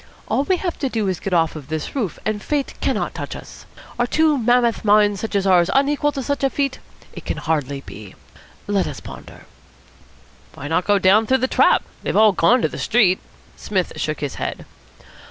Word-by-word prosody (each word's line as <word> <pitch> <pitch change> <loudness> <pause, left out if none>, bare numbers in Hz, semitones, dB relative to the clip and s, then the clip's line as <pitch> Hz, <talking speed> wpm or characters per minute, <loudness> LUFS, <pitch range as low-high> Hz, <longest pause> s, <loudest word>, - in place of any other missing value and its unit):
All 275 - 0
we 370 +2 +2
have 350 -1 -4
to 270 - -1
do 220 -4 -1
is 185 -2 -1
to - - -18
get 195 - -2
off 165 -1 +2
this 155 +1 -5
roof, 225 - -2
and 215 -1 -1
fate 290 +2 -2
cannot - - -1
touch - - -6
us. - - -12 0.3
Are 240 - +2
two 315 +2 +3
mammoth 240 -2 +2
minds 205 -2 +3
such 220 -2 -4
as 200 -1 +1
ours 180 -3 +4
unequal 290 +1 +2
to 270 - -4
such 285 +2 -2
a 270 - +3
feat? 275 -1 -2 0.3
It - - -9
can - - -4
hardly 145 -4 -2
be. 105 -6 -11 0.5
Let 200 -2 0
us - - -6
ponder." - - -12 1.1
"Why 145 - -7
not 165 +4 0
go 205 -1 +4
down 200 +3 +4
through 265 - +3
the 260 0 0
trap? - - +3 0.2
They've - - -1
all 215 0 +6
gone 225 +7 +3
to - - +4
the - - -8
street." 215 -6 +3 0.4
Psmith 190 -4 -2
shook 155 0 -3
his 140 -4 -3
head. - - -4
210 Hz, 205 wpm, -21 LUFS, 175-260 Hz, 1.1 s, all